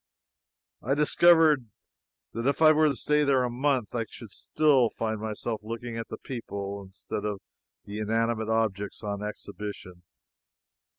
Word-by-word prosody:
I 135 +4 0
discovered 155 -3 +5 0.7
that 115 +3 -2
if 140 - +1
I 155 -1 +8
were 155 0 +4
to 140 - +1
stay 150 +3 +2
there 135 -3 +3
a 125 - -1
month, 130 -3 0
I 115 -2 -1
should 110 -4 -11
still 135 -4 +3
find 110 -1 -3
myself 110 +1 -3
looking 115 +2 -6
at 115 0 -4
the - - -7
people 100 -5 -6
instead 95 +1 -6
of 105 -2 -2 0.5
the 105 +1 -6
inanimate 110 +1 0
objects 110 -2 -1
on 100 -1 -3
exhibition. 105 -3 -7
115 Hz, 150 wpm, -27 LUFS, 105-135 Hz, 0.7 s, I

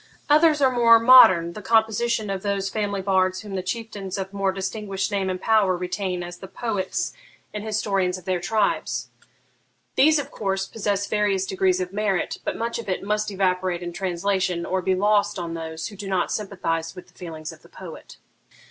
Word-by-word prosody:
Others 305 0 +5
are 260 - +5
more 235 -2 +6
modern, 205 -8 +7
the 210 - -8
composition 220 0 +1
of 195 -1 -3
those 200 -1 -2
family 205 -3 -2
bards 185 -1 +1
whom 205 -2 -9
the 190 - -2
chieftains 200 -1 -5
of 190 0 -5
more 195 -1 0
distinguished 195 +1 -3
name 195 -2 -1
and 185 0 -3
power 200 -4 +2
retain 180 0 -3
as 175 0 -8
the 190 - -9
poets 205 - -3 0.4
and 210 -1 -5
historians 195 -4 0
of 180 - -14
their 185 -1 0
tribes. 205 +3 -1 0.9
These, 310 +3 +5
of 290 - -4
course, 195 -2 -2
possess 200 -1 -2
various 200 -2 0
degrees 190 -1 +1
of 185 0 -4
merit; 200 -3 -1
but - - -3
much 235 +1 -3
of 230 - -7
it 185 - -2
must 210 +1 -1
evaporate 185 -2 0
in 175 0 -5
translation, 185 -1 -1
or 190 0 -1
be 185 +1 +1
lost 205 +1 +2
on 170 -2 -4
those 160 +1 -5
who 205 - -12
do 200 0 -7
not 190 -2 0
sympathise 170 -5 -3
with 180 - -11
the - - -26
feelings 160 -3 -8
of - - -15
the - - -19
poet.' - - -11
195 Hz, 190 wpm, -24 LUFS, 185-210 Hz, 0.9 s, modern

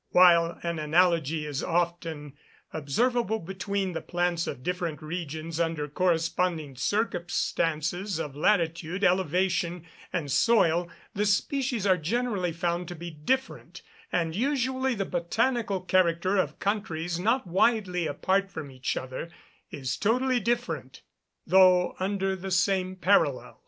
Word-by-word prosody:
While 170 -2 +6
an 170 -1 -2
analogy 160 -1 +2
is 145 -2 -3
often 165 -4 -2 0.4
observable 220 - 0
between 195 0 -3
the - - -3
plants 175 -1 -1
of 125 - -5
different 175 -3 -2
regions 160 0 -5
under 165 -3 -1
corresponding 165 -2 0
circumstances 175 - -1
of 150 -4 -5
latitude, 170 +1 0
elevation, 180 -1 +1 0.3
and 160 -6 -2
soil, 175 - +3 0.2
the 210 +1 0
species 240 +2 0
are 185 -2 +4
generally 195 +1 -1
found 170 +1 -2
to 175 - -6
be 170 +1 -7
different; 260 - -3 0.3
and 165 -1 0
usually 260 +1 0
the 195 -2 -2
botanical 205 +4 0
character 185 0 +2
of 190 - 0
countries 175 -5 -2
not 230 +7 +1
widely 180 -2 +1
apart 195 +4 0
from 155 -7 -7
each 130 0 -3
other, 130 +6 -5 0.4
is 130 -4 -4
totally 250 +4 +2
different, 240 +2 -3 0.4
though 185 -1 +5
under 195 0 -1
the 190 +1 -6
same 185 0 +1
parallels. 165 -8 +1
180 Hz, 125 wpm, -27 LUFS, 165-200 Hz, 0.4 s, While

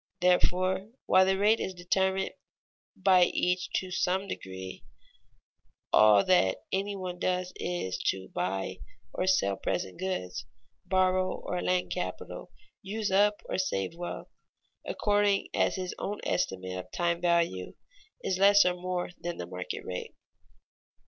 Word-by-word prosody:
Therefore, 185 +2 +2 0.2
while 185 0 +5
the 190 0 +2
rate 210 +3 +4
is 190 - -3
determined 190 +2 0 0.6
by 185 -2 +5
each 180 0 0
to 185 -1 -1
some 190 +2 0
degree, 95 - -7 1.1
all 105 -2 +7
that 135 - +4
any 200 +1 -1
one 180 -2 -5
does 180 0 -1
is 135 - -3
to 95 -1 -1
buy 95 +2 -2 0.3
or 185 - -1
sell 100 - +2
present 95 - -3
goods, 135 - -3 0.4
borrow 185 0 +2
or 180 - -4
lend 180 0 0
capital, - - -5 0.3
use 205 +1 -3
up 205 +2 +3
or - - -2
save 165 - -1
wealth, 175 +1 -6 0.6
according 205 -1 +2
as - - +2
his 185 -2 -3
own 205 +1 -3
estimate 95 -1 -1
of 90 0 -9
time 170 0 0
value 170 - +1 0.5
is 185 -1 -1
less 200 0 +7
or 180 - +3
more 180 0 -3
than 175 0 -4
the - - -4
market 90 0 -6
rate. 90 -1 -5
180 Hz, 135 wpm, -29 LUFS, -, 1.1 s, all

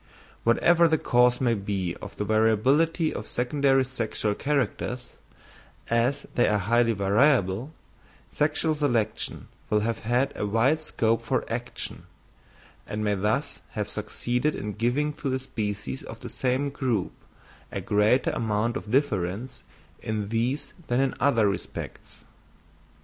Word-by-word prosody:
Whatever 170 +9 +5
the 160 0 +3
cause 125 -2 +3
may 120 -3 +2
be 100 -4 -2
of - - -9
the 105 - -3
variability 130 - +3
of - - -6
secondary 135 +1 +2
sexual 115 -4 -2
characters, 130 -1 -2 0.7
as 125 +5 +1
they 120 - +3
are 105 - +3
highly 115 +4 +2
variable, 105 +3 +2 0.6
sexual 155 +2 +1
selection 120 -8 -1 0.2
will 105 0 +2
have 115 +1 -1
had 125 +5 +1
a 105 - -2
wide 125 +9 +2
scope 115 -6 +1
for 115 - -1
action, 120 +1 -5 0.8
and 105 +1 -3
may 105 -1 +2
thus 105 +2 -1
have - - -2
succeeded 125 +5 -1
in 105 +1 -4
giving 125 +8 0
to 140 - -4
the 130 - +1
species 105 - -4
of - - -10
the - - -7
same 130 +2 0
group 125 -9 -1 0.6
a - - -3
greater 105 +5 +2
amount 110 +1 0
of 105 - -5
difference 115 -2 0 0.4
in 105 -2 -3
these 120 +6 -1
than 120 +1 +1
in 135 -1 +2
other 115 -6 +3
respects. 95 -3 -6
120 Hz, 135 wpm, -26 LUFS, 105-135 Hz, 0.8 s, Whatever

